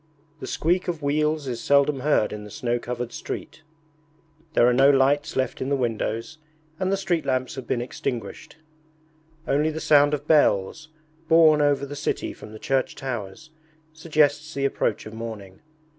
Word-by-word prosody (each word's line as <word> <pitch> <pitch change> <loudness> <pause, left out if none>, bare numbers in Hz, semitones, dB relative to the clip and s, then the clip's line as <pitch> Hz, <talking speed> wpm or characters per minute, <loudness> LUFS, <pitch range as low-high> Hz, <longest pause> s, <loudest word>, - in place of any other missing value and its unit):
The 130 - -7
squeak 180 +4 0
of 165 -4 -3
wheels 150 +1 0
is 120 -2 -4
seldom 140 0 +3
heard 130 -7 +1
in 105 0 -7
the 105 - -10
snow 120 -1 -2
covered 120 0 -5
street. - - -7 0.9
There 120 - +5
are 125 - +4
no 135 +3 +5
lights 140 +1 +2
left 130 0 -1
in 130 - -2
the 140 - +2
windows 120 +3 -3 0.4
and 190 0 0
the 195 - +1
street 175 -4 -1
lamps 130 -1 -1
have 130 -4 -8
been 120 - -1
extinguished. 120 +2 -6 0.9
Only 150 +3 +2
the 160 0 -4
sound 145 -1 +4
of 145 0 -9
bells, 150 -1 +2 0.4
borne 160 -2 +6
over 145 -1 +2
the 145 +1 -7
city - - -3
from 105 - -12
the 110 - -9
church 135 +3 -1
towers, 125 +3 -6 0.4
suggests 155 -1 +1
the 140 0 0
approach 140 - -1
of 110 - -9
morning. 110 -4 -8
140 Hz, 170 wpm, -24 LUFS, 120-155 Hz, 0.9 s, borne